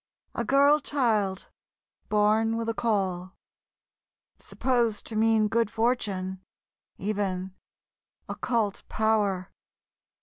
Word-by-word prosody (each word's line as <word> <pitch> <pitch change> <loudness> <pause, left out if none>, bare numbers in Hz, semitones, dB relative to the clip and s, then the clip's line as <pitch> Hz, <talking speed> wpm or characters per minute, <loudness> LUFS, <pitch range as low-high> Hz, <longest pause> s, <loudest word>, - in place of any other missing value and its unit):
A - - -2
girl 280 +2 +4
child, 215 -10 0 0.6
born 215 +2 +2
with 230 0 -3
a - - 0
caul... 190 -5 -1 1.0
supposed 240 -4 -1
to 225 - -6
mean 220 0 +3
good 230 0 +1
fortune, 200 -6 -1 0.6
even 190 -2 -2 0.7
occult 225 -5 -1
power. 205 -4 0
215 Hz, 90 wpm, -27 LUFS, 195-230 Hz, 1.0 s, girl